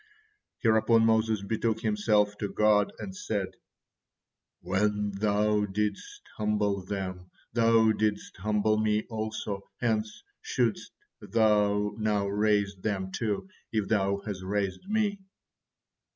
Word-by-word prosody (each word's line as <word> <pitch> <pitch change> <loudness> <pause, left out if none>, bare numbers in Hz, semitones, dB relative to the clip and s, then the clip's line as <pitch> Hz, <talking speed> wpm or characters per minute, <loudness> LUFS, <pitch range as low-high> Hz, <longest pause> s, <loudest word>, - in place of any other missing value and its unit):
Hereupon 115 0 +4
Moses 110 -2 +2
betook 110 +1 -1
himself 105 -2 +2
to 100 - -2
God 105 -1 +3
and 190 - -7
said; 105 - -2 1.1
"When 105 +2 0
Thou 105 +1 +1
didst 105 +1 -3
humble 105 -2 0
them, 90 -2 -5 0.2
Thou 115 -1 +4
didst 105 -1 -1
humble 105 +2 +1
me 110 0 +1
also, 110 -2 -4
hence 110 -2 -1 0.2
shouldst 445 +1 -1 0.3
Thou 105 -2 +2
now 105 -2 +1
raise 100 0 +1
them 95 -1 -3
too, 105 - -2 0.2
if 110 -3 -1
Thou 100 -2 +2
has 100 -4 -4
raised 100 - -2
me." 210 -2 +1
105 Hz, 110 wpm, -28 LUFS, 100-110 Hz, 1.1 s, Hereupon